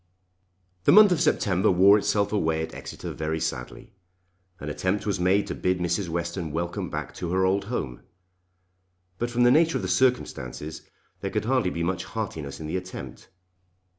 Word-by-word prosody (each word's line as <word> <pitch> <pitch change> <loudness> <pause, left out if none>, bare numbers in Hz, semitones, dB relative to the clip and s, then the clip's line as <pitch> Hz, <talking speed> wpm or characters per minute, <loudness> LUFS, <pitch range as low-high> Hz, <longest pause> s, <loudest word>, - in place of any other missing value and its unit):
The - - +6
month 210 -2 +8
of 165 -4 +2
September 100 - +2
wore 95 +2 +6
itself 100 0 0
away 80 -5 +1
at - - -7
Exeter - - -7
very 80 +1 -2
sadly. 70 -6 -5 0.7
An 75 - -7
attempt 95 +7 -1
was 100 -3 -1
made 95 +3 +3
to - - -4
bid 90 0 0
Mrs. 90 +1 -1
Western 85 0 -3
welcome 85 +3 -3
back - - -5
to 85 -2 -5
her 95 +1 +2
old 95 +1 +1
home; 65 - -4 1.2
but 120 - -1
from 120 +1 +1
the 120 - +6
nature 165 +4 +4
of - - -5
the - - -1
circumstances 80 - -1 0.4
there - - -3
could - - -2
hardly 125 -5 +2
be 85 -1 -3
much 90 +1 -2
heartiness 70 -3 -5
in 80 - -6
the 80 +4 -2
attempt. 90 0 -8
90 Hz, 175 wpm, -26 LUFS, 80-105 Hz, 1.2 s, month